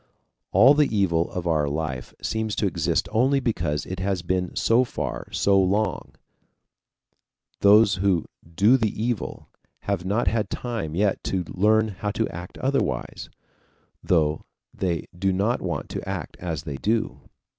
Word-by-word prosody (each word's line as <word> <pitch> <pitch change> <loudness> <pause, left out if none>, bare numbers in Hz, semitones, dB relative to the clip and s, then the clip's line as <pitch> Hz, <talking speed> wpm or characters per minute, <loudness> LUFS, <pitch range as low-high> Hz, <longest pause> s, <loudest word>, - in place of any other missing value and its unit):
All 120 +9 +7
the 150 -1 +3
evil 90 -7 +1
of 90 -1 -5
our 75 -4 +1
life 70 -4 -4
seems 110 -1 -2
to - - 0
exist 95 - 0
only 130 +5 +3
because 75 - -1
it 95 0 -6
has 95 -2 -1
been 90 +1 -1
so 115 +3 +3
for 125 - -4
so 100 -1 +3
long; 100 +3 0 1.5
those 100 -1 +6
who 95 -3 +1 0.3
do 110 +8 +5
the 110 -4 +1
evil 115 -1 -3 0.3
have 100 -3 -2
not 100 +5 0
had 110 +2 +1
time 115 -11 -4
yet 100 +1 +1
to 95 -2 -1
learn 110 +3 +3
how 100 +1 -4
to 110 0 0
act 90 +2 -8
otherwise, 135 +1 -2 0.7
though 80 -4 +1 0.3
they 85 -4 -2
do 95 +2 0
not 100 +6 0
want - - -3
to - - -5
act - - -5
as 80 -5 -4
they 70 -4 -5
do. 110 +8 -1
100 Hz, 150 wpm, -24 LUFS, 85-110 Hz, 1.5 s, All